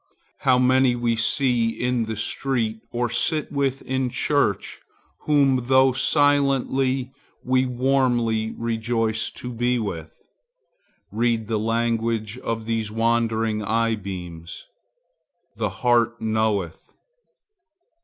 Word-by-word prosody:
How 130 Hz, -2 st, +3 dB
many 130 Hz, 0 st, +3 dB
we 120 Hz, -1 st, 0 dB
see 120 Hz, 0 st, +2 dB
in 120 Hz, 0 st, -1 dB
the 110 Hz, 0 st, -4 dB
street, 115 Hz, 0 st, -1 dB
or 120 Hz, 0 st, -1 dB
sit 145 Hz, +6 st, -1 dB
with 140 Hz, -2 st, -1 dB
in 130 Hz, -1 st, -1 dB
church, 135 Hz, -4 st, 0 dB, 0.5 s
whom, 135 Hz, -4 st, +3 dB
though 130 Hz, +1 st, +5 dB
silently, 135 Hz, -2 st, +1 dB, 0.3 s
we 130 Hz, +1 st, +2 dB
warmly 120 Hz, -4 st, +1 dB
rejoice 115 Hz, -1 st, -1 dB
to 125 Hz, 0 st, -8 dB
be 120 Hz, +2 st, 0 dB
with! 85 Hz, -8 st, -5 dB, 0.9 s
Read 115 Hz, 0 st, 0 dB
the 110 Hz, -1 st, -1 dB
language 115 Hz, 0 st, -1 dB
of 115 Hz, -2 st, -4 dB
these 115 Hz, -2 st, -2 dB
wandering 115 Hz, -1 st, 0 dB
eye 115 Hz, +2 st, +1 dB
beams. 90 Hz, -5 st, -7 dB, 0.9 s
The -, -, -1 dB
heart 120 Hz, -1 st, +1 dB
knoweth. 110 Hz, -6 st, -2 dB
115 Hz, 105 wpm, -23 LUFS, 110-130 Hz, 0.9 s, though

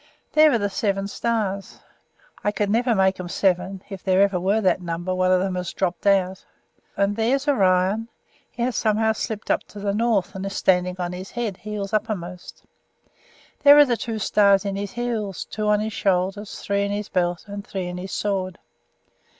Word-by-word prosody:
There 310 Hz, 0 st, +6 dB
are 240 Hz, -, +3 dB
the 205 Hz, -2 st, 0 dB
Seven 195 Hz, -1 st, -1 dB
Stars 200 Hz, -3 st, -2 dB, 0.7 s
I 205 Hz, -, +2 dB
never 230 Hz, +5 st, +1 dB
could 230 Hz, -, +3 dB
make 190 Hz, 0 st, +2 dB
'em 180 Hz, -1 st, -5 dB
seven; 190 Hz, +1 st, 0 dB
if 195 Hz, -3 st, -8 dB
there 190 Hz, -1 st, +2 dB
ever 195 Hz, -2 st, +1 dB
were 195 Hz, +5 st, +2 dB
that 190 Hz, -3 st, +2 dB
number 175 Hz, +1 st, -3 dB
one 185 Hz, 0 st, +2 dB
of 185 Hz, -, +4 dB
'em 190 Hz, -1 st, -1 dB
has 180 Hz, -1 st, -4 dB
dropped 185 Hz, +1 st, -2 dB
out. 190 Hz, -2 st, +2 dB, 0.5 s
And 200 Hz, +1 st, +1 dB
there's 260 Hz, +6 st, 0 dB
Orion; 195 Hz, -3 st, +2 dB, 0.4 s
he 235 Hz, -, -4 dB
has 250 Hz, 0 st, -1 dB
somehow 220 Hz, 0 st, +2 dB
slipped 220 Hz, -1 st, -3 dB
up -, -, +2 dB
to 205 Hz, -, -11 dB
the 200 Hz, 0 st, -1 dB
north, 210 Hz, -4 st, +1 dB
and 190 Hz, -1 st, -6 dB
is 195 Hz, 0 st, -4 dB
standing 180 Hz, -1 st, +2 dB
on 175 Hz, -1 st, -3 dB
his 185 Hz, +2 st, -7 dB
head, 230 Hz, -6 st, -3 dB
heels 210 Hz, -2 st, -5 dB
uppermost. 190 Hz, -5 st, -4 dB, 1.0 s
There 285 Hz, 0 st, +8 dB
are 295 Hz, -, +9 dB
the 245 Hz, -3 st, +1 dB
two 225 Hz, -1 st, -4 dB
stars 200 Hz, -1 st, +3 dB
in 200 Hz, -1 st, -2 dB
his 200 Hz, 0 st, -4 dB
heels, 225 Hz, -5 st, -3 dB
two 215 Hz, 0 st, -4 dB
on 210 Hz, 0 st, +3 dB
his 220 Hz, 0 st, -3 dB
shoulders, 195 Hz, +2 st, -1 dB
three 200 Hz, 0 st, -1 dB
in 200 Hz, -, -1 dB
his 205 Hz, 0 st, -3 dB
belt, 175 Hz, -1 st, 0 dB
and 200 Hz, 0 st, -6 dB
three 190 Hz, -2 st, -4 dB
in 180 Hz, 0 st, -5 dB
his 190 Hz, +1 st, -7 dB
sword. 190 Hz, -3 st, -2 dB
200 Hz, 195 wpm, -23 LUFS, 185-215 Hz, 1.0 s, are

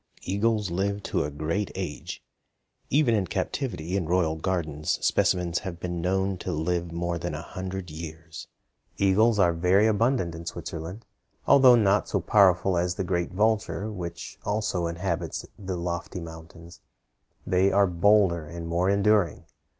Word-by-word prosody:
Eagles 105 Hz, 0 st, 0 dB
live 100 Hz, +3 st, -1 dB
to -, -, -1 dB
a 75 Hz, -, -3 dB
great 80 Hz, +7 st, -2 dB
age; -, -, -5 dB, 0.7 s
even 140 Hz, -4 st, +3 dB
in 100 Hz, -4 st, +1 dB
captivity 95 Hz, -, -3 dB
in 90 Hz, -5 st, -1 dB
royal 85 Hz, -2 st, +1 dB
gardens 80 Hz, -3 st, -2 dB
specimens 90 Hz, -1 st, +2 dB
have 90 Hz, -4 st, -7 dB
been 85 Hz, -1 st, -4 dB
known 95 Hz, +1 st, 0 dB
to -, -, -4 dB
live 85 Hz, +2 st, -1 dB
more 85 Hz, 0 st, -2 dB
than 85 Hz, -2 st, -4 dB
a 75 Hz, -, -5 dB
hundred 95 Hz, -1 st, -6 dB
years. 80 Hz, +1 st, -8 dB, 0.5 s
Eagles 105 Hz, +3 st, +3 dB
are 90 Hz, -4 st, +4 dB
very 90 Hz, +5 st, +3 dB
abundant 110 Hz, -4 st, +1 dB
in 85 Hz, 0 st, -8 dB
Switzerland. 85 Hz, +5 st, -6 dB, 0.4 s
Although 130 Hz, -3 st, +7 dB
not 105 Hz, -3 st, +2 dB
so 100 Hz, -, +1 dB
powerful 95 Hz, -1 st, +4 dB
as 90 Hz, 0 st, -1 dB
the 95 Hz, -, -2 dB
great 85 Hz, -1 st, -1 dB
vulture, 110 Hz, +1 st, 0 dB
which 85 Hz, -4 st, -7 dB
also 105 Hz, -5 st, -1 dB
inhabits 85 Hz, 0 st, -3 dB
the 95 Hz, -2 st, -4 dB
lofty 85 Hz, +1 st, -4 dB
mountains, 85 Hz, +1 st, -11 dB, 0.7 s
they 95 Hz, +2 st, +3 dB
are 100 Hz, +1 st, +4 dB
bolder 90 Hz, -2 st, +3 dB
and 85 Hz, +1 st, -7 dB
more 85 Hz, +3 st, +1 dB
enduring. 100 Hz, -4 st, +2 dB
90 Hz, 150 wpm, -26 LUFS, 85-100 Hz, 0.7 s, Although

